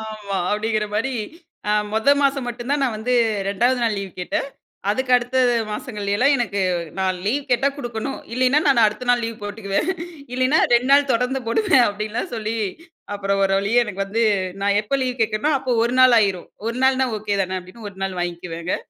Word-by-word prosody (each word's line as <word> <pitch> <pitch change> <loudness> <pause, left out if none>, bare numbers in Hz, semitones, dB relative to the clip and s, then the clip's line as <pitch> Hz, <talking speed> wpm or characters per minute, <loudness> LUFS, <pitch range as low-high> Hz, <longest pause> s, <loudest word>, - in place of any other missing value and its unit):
ஆமா 215 -3 -5
அப்டிங்கிற 215 +1 0
மாரி, 260 +5 0 0.6
அ - - +3 0.2
மொத 220 +5 0
மாசம் 275 -2 +1
மட்டும் 240 +2 -6
தான் 290 - +1
நான் 245 -5 0
வந்து 245 +4 -1 0.3
2வது 240 +6 +2
நாள் 220 -3 +1
லீவ் 195 -1 -5
கேட்டேன். 180 - -2 0.4
அதுக்கு 255 +5 -1
அடுத்த 245 +1 -1 0.3
மாசங்கள்லலாம் 210 +4 0
எனக்கு 205 -5 -1 0.4
நான் 185 -1 0
லீவ் 270 +7 -1
கேட்டா 245 +3 +3
குடுக்கணும் 240 0 -4 0.2
இல்லைனா, 255 +4 +3
நான் 240 -5 +5
அடுத்த 215 +4 -2
நாள் 240 -1 +3
லீவ் 225 -2 -7
போட்டுக்குவேன். 205 - -2 0.4
இல்லைன்னா 255 +4 +2
2 240 +2 +3
நாள் 280 0 +5
தொடர்ந்து 250 +3 0
போடுவேன். 295 - +4
அப்டின்லாம் 215 +4 -4
சொல்லி 220 +1 -3 0.6
அப்புறம் 200 -1 -1
ஒரு 195 - +2
வழியே 215 +5 +2
எனக்கு 200 -1 -3
வந்து, 225 +4 0 0.4
நான் 200 0 +2
எப்போ 245 +6 -1
லீவ் 255 -1 -2
கேட்கேனோ, 215 +6 +1
அப்போ 260 -1 -3
1 240 +1 0
நாள் 255 -2 +7
ஆயிரும். 195 -4 0 0.2
1 235 +1 -3
நாள்னா 265 0 +3
ஓகே 205 -1 -2
தானே 185 0 -2
அப்டின்னு 205 +4 -11
1 190 - -18
நாள் 190 -2 -3
வாங்கிக்குவேங்க. 170 0 -3
225 Hz, 180 wpm, -21 LUFS, 205-255 Hz, 0.6 s, நாள்